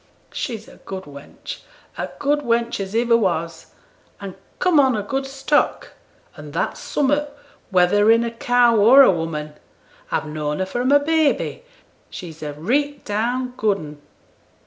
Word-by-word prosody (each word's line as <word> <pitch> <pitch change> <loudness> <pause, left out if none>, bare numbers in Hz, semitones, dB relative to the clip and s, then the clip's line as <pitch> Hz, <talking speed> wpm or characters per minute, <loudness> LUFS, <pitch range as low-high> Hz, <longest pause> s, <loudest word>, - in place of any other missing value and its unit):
'She's 225 -2 -5
a - - -15
good 190 -1 -8
wench 145 - -10 0.4
a - - -4
good 290 +1 +1
wench 235 -4 -1
as 195 +2 -5
iver 235 0 +3
was 170 -6 -1 0.5
an 195 -2 -7 0.2
come 360 -5 +3
on 265 -3 +4
a 205 - -2
good 270 +6 -3
stock, 275 +2 0 0.4
an' - - -10
that's - - -2
summat, 290 +1 -1 0.3
whether 195 +3 +3
in 230 +1 +5
a 235 - -3
cow 240 0 +3
or 245 +7 +8
a - - +6
woman. 160 -3 -4 0.6
A've - - -1
known 150 -1 -3
her 190 - -1
from 245 +7 -1
a 285 - +7
baby; 315 - 0 0.5
she's 165 -3 -9
a 150 -1 -5
reet 280 - -1
down 245 +4 -2
good 210 -2 +1
un.' 150 -4 -10
230 Hz, 155 wpm, -21 LUFS, 180-270 Hz, 0.6 s, or